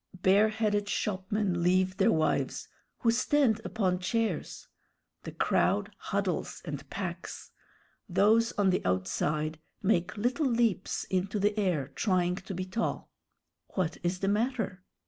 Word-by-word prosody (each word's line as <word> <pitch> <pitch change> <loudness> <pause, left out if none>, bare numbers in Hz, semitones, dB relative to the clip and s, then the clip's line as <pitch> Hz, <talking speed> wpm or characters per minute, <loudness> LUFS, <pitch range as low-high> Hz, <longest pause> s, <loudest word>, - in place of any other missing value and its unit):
Bareheaded 205 +1 +3
shopmen 190 -2 -1
leave 185 +2 +2
their 200 +4 +4
wives, 160 -4 0 0.3
who 230 - +4
stand 250 -2 +2
upon 185 -6 0
chairs. 225 +4 -2 0.5
The - - -7
crowd - - +1
huddles - - -2
and - - -6
packs. - - -6 0.6
Those 225 +3 +4
on 200 -2 +3
the 185 - 0
outside 150 - -1 0.2
make 185 -1 +1
little 255 +8 +1
leaps 230 -6 +1
into 190 +3 0
the 205 +1 +1
air, 175 -10 0
trying 180 +2 +1
to 190 0 -6
be 185 +1 -3
tall. 190 +5 -3 0.6
"What 180 -4 0
is 175 +1 -1
the 195 - 0
matter?" 210 -3 -1
195 Hz, 125 wpm, -30 LUFS, 180-220 Hz, 0.6 s, their